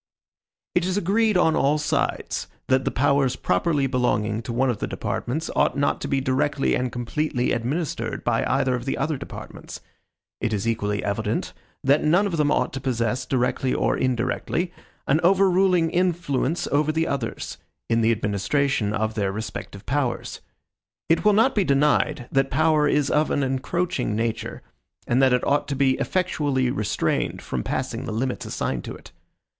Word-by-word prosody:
It 180 - +2
is 185 +2 0
agreed 205 +2 +2
on 160 -3 +3
all 145 +2 +3
sides, 150 - -1 0.2
that 130 0 +3
the - - +2
powers 135 -1 +2
properly 140 - +1
belonging 115 -4 0
to 115 - -6
one 125 +2 +2
of 110 - -5
the - - -2
departments 155 +6 -3
ought - - +2
not 140 - +1
to - - -3
be 135 - +1
directly 135 +2 +1
and 125 0 0
completely 125 +2 -1
administered 120 -1 -2
by 115 -1 +1
either 135 -1 +1
of 125 -1 -3
the 135 - -1
other 155 -1 0
departments. - - -9 0.6
It 110 - -1
is 105 +1 -1
equally 105 -2 -1
evident, 100 0 -2 0.3
that 140 +3 +3
none 175 +7 +4
of 180 -5 -2
them 150 -1 +2
ought - - +1
to 135 - -4
possess, 125 0 -1
directly 130 0 0
or - - +1
indirectly, 130 +8 -1 0.3
an 145 +3 +3
overruling 185 -2 +4
influence 170 -4 0
over 150 +2 +2
the 160 +1 0
others, 130 -7 -4 0.3
in 115 0 +2
the 115 +1 +3
administration 105 +2 0
of 110 +1 -1
their 100 -3 -1
respective 105 -1 -6
powers. 135 -2 -2 0.7
It 165 - +3
will 210 0 +5
not 225 +6 +4
be 205 - +2
denied, 140 -4 +2
that 135 0 +2
power 155 +1 +3
is 145 -1 +1
of 150 +1 +2
an 140 - +1
encroaching 135 - -1
nature, 115 0 -3 0.4
and 125 +3 +2
that 135 -1 +5
it 125 0 +2
ought 145 - +1
to 140 - -2
be 135 -1 +3
effectually 145 -8 0
restrained 105 -4 -1
from 65 - -3
passing - - -3
the - - -4
limits 125 +4 -2
assigned 60 - -2
to - - -6
it. - - -14
135 Hz, 170 wpm, -24 LUFS, 120-155 Hz, 0.7 s, will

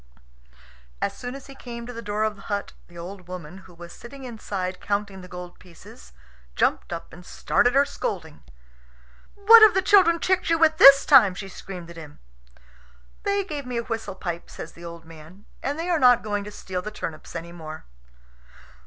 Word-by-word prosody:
As - - -2
soon 245 +1 -7
as 275 - -10
he 275 - -12
came 235 -3 -9
to 245 - -8
the 230 - -7
door 210 0 -2
of 215 -1 -1
the 200 - -15
hut, 200 0 -4
the 175 - -16
old 180 +1 -9
woman, 180 0 -8
who 185 -1 -17
was 170 0 -11
sitting 270 +3 -12
inside 200 -6 -5
counting 200 -2 -3
the 180 - -11
gold 180 0 -10
pieces, 160 - -16 0.4
jumped - - 0
up 170 -1 -7
and 180 - -12
started 245 +7 +1
her 280 +1 +5
scolding. 165 - -5 0.9
"What 440 +3 +8
have 435 -3 +8
the 380 - +3
children 375 -4 +5
tricked 370 +1 0
you 330 - +3
with 315 -1 +3
this 275 0 +9
time?" 230 -10 +6
she 195 +1 -7
screamed 180 -2 -9
at 170 - -13
him. 150 -3 -11 1.0
"They 400 0 0
gave 295 -7 -6
me 245 -1 -3
a 235 - -1
whistle 225 -5 -5
pipe," 175 -3 -6
says 160 - -9
the 170 - -15
old 170 -1 -9
man, 165 +5 -15 0.2
"and 280 +2 -3
they 330 +2 -4
are 345 -3 +1
not 250 -2 +5
going 205 -1 -2
to 210 - -8
steal 185 -3 -5
the 215 - -6
turnips 165 -7 -8
any 170 +1 -6
more." 155 -2 -9
205 Hz, 195 wpm, -24 LUFS, 175-270 Hz, 1.0 s, this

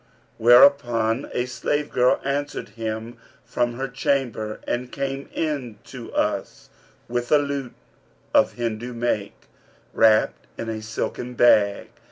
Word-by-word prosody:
Whereupon 120 -1 +5
a 125 - -1
slave 145 +3 -2
girl 125 0 +3
answered 145 -1 -3
him 110 +1 -5 0.3
from 120 0 -1
her 130 +3 -3
chamber 125 -5 -1
and 125 +1 -2
came 135 0 -4
in 140 -8 -3
to - - -10
us, - - -2 0.4
with 120 0 -3
a 150 - +7
lute 140 -3 -3 0.6
of - - +4
Hindu 120 +1 -4
make, 115 -4 -2 0.6
wrapped 110 -1 +3
in 115 - -5
a 110 -1 -4
silken 115 +3 -4
bag. 105 -4 +4
120 Hz, 125 wpm, -23 LUFS, 115-135 Hz, 0.6 s, a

